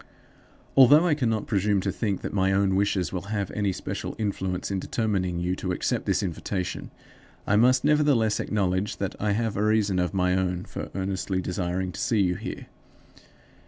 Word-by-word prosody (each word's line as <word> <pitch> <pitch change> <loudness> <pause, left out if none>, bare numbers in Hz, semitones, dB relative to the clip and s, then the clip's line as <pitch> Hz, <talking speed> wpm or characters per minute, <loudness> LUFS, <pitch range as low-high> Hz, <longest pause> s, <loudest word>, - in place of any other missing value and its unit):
Although 145 +5 +7
I 170 - +3
cannot 115 -7 0
presume 100 -1 +1
to - - -1
think 100 -5 -2
that - - -5
my 95 -1 +2
own 95 -1 +2
wishes 95 -2 0
will 90 - -2
have 100 -3 -2
any 100 -2 0
special - - -5
influence 95 -4 -2
in 95 - -1
determining 95 -4 -1
you 90 +1 -1
to 90 - -3
accept 90 - -1
this - - +1
invitation, 90 +1 -4 0.6
I 100 - +2
must 125 +4 +4
nevertheless 145 -7 +3
acknowledge 95 -1 -1
that 100 -2 -3
I 105 -1 +1
have 110 0 -1
a 105 - 0
reason 105 -3 +2
of 90 -1 0
my 90 -1 +2
own 90 -1 -1
for - - -6
earnestly 95 0 -2
desiring 90 0 -2
to - - -8
see 110 -4 +1
you 90 -2 +2
here. - - -6
100 Hz, 180 wpm, -26 LUFS, 95-110 Hz, 0.6 s, Although